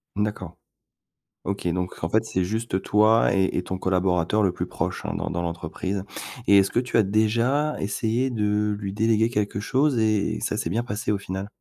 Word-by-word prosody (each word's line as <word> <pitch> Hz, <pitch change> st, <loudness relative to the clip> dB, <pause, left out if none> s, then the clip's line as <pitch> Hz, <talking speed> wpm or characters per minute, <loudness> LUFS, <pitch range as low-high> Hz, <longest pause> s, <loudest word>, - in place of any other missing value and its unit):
D'accord. 100 Hz, -5 st, -3 dB, 0.9 s
OK, 100 Hz, -1 st, -3 dB
donc 90 Hz, -1 st, -3 dB
en 80 Hz, -, 0 dB
fait 110 Hz, +2 st, +2 dB
c'est 95 Hz, -4 st, -1 dB
juste 105 Hz, -1 st, -2 dB
toi 110 Hz, +2 st, +4 dB
et 95 Hz, -1 st, +1 dB
et -, -, +1 dB
ton 95 Hz, +1 st, -4 dB
collaborateur 90 Hz, +1 st, +1 dB
le 95 Hz, -3 st, +3 dB
plus 90 Hz, -, -4 dB
proche, -, -, -4 dB
hein, -, -, -2 dB
dans -, -, -2 dB
dans 85 Hz, 0 st, -2 dB
l'entreprise. 85 Hz, +3 st, -3 dB, 0.4 s
Et 100 Hz, -, +7 dB
est-ce 95 Hz, 0 st, +4 dB
que -, -, +2 dB
tu 125 Hz, -1 st, 0 dB
as 110 Hz, -, +5 dB
déjà 115 Hz, +9 st, +1 dB
essayé 115 Hz, +5 st, 0 dB
de 105 Hz, -1 st, 0 dB
lui 100 Hz, -2 st, -4 dB
déléguer 110 Hz, +1 st, +2 dB
quelque 105 Hz, -3 st, -1 dB
chose 130 Hz, +3 st, +1 dB
et 110 Hz, -2 st, +1 dB
ça -, -, -1 dB
s'est 85 Hz, -, -2 dB
bien 115 Hz, +4 st, 0 dB
passé 105 Hz, -2 st, -3 dB
au 100 Hz, -, 0 dB
final? 95 Hz, 0 st, -5 dB
105 Hz, 195 wpm, -24 LUFS, 95-110 Hz, 0.9 s, Et